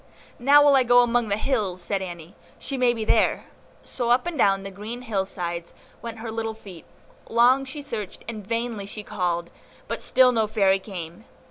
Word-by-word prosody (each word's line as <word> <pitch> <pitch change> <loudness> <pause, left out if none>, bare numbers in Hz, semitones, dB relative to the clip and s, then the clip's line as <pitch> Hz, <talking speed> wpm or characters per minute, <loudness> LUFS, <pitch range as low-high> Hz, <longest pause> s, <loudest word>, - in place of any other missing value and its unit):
"Now 285 +4 +6
will 285 -1 +6
I 265 - +5
go 245 0 +5
among 240 -1 +1
the 200 0 0
hills," 215 -7 -1
said 195 +2 -2
Annie, 175 -2 -8 0.2
"she 275 - -4
may 250 -2 +3
be 225 -2 -4
there." - - +2 0.4
So 240 -2 -3
up 245 +5 +3
and 350 -1 -3
down 195 -7 +2
the 195 - -7
green 220 +6 -7
hill 200 -5 -1
sides 170 -2 -5 0.3
went 230 -1 -7
her 225 0 -6
little 225 0 -3
feet; 190 -6 -12 0.4
long 250 +4 +4
she 285 +2 -7
searched 220 -8 -6
and 220 -3 -6
vainly 230 -1 -3
she 210 +1 -6
called; 175 -5 -2 0.4
but - - -4
still 255 -1 +5
no 225 -3 +1
Fairy 195 -3 +2
came. 185 +1 -8
220 Hz, 195 wpm, -24 LUFS, 195-245 Hz, 0.4 s, Now